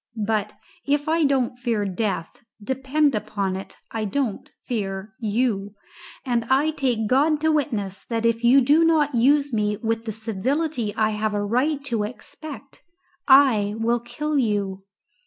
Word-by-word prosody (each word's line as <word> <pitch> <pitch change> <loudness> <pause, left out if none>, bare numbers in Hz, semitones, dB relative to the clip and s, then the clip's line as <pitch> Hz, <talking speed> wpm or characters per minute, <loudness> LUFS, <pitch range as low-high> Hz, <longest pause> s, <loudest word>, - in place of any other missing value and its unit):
But 210 -1 -1 0.3
if 290 +1 0
I 320 0 +2
don't 255 -3 0
fear 230 -5 -1
death, 195 -2 -3 0.2
depend 265 +6 0
upon 200 -3 -2
it, 190 - -8
I 220 -1 -2
don't 230 -1 -2
fear 200 -3 -4
you 210 -3 -1 0.5
and 240 -3 0
I 275 +5 +2
take 245 -7 -1
God 290 +6 +3
to 315 0 +3
witness 220 -11 -1
that 230 -1 -2
if 230 0 +1
you 255 +4 +6
do 295 +6 +4
not 310 -3 +3
use 280 +3 +3
me 210 -1 0
with 225 0 -2
the 220 - -3
civility 230 +4 -2
I 220 -1 +2
have 215 0 -1
a 205 0 -1
right 275 +7 0
to 235 -5 0
expect, 275 +6 -8 0.5
I 250 -7 +5
will 235 +2 +1
kill 285 +6 -2
you." 205 -5 -1
235 Hz, 155 wpm, -23 LUFS, 210-280 Hz, 0.5 s, you